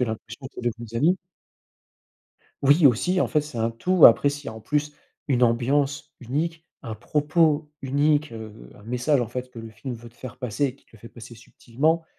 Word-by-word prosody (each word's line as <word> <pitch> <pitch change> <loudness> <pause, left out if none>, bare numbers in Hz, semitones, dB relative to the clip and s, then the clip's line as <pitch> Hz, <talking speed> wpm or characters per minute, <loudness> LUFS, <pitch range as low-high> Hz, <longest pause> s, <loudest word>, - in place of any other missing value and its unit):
l'impression 115 +2 -4
que - - -14
c'est - - -8
devenu 120 0 -3
tes 115 +2 -7
amis. 170 +9 +3 1.5
Oui 145 +3 +6
aussi, 180 +10 +2
en - - +3
fait, 155 - +1
c'est 145 -5 -8
un 115 +1 +1
tout, 175 +10 +6
après 120 +4 +5
s'il 145 +1 -5
y - - -2
a - - -6
en 110 - -10
plus, 150 +4 -1 0.4
une 125 -3 +2
ambiance 135 +5 +1
unique, 160 +7 -3 0.2
un 115 -4 -5
propos 150 +2 +1
unique, 145 +1 +1
heu, 110 - -10
un 105 - -16
message 125 +4 +1
en 120 - -2
fait, 125 +1 -6
que 120 - -11
le 115 0 -8
film 120 +4 -7
veut 120 +1 -11
te 115 - -24
faire 125 0 -10
passer 125 +2 -2
et 130 - -5
qu'il - - -30
te - - -24
le - - -20
fait 115 - -11
passer 120 0 -12
subtilement. 145 +8 -1
130 Hz, 215 wpm, -24 LUFS, 115-150 Hz, 1.5 s, Oui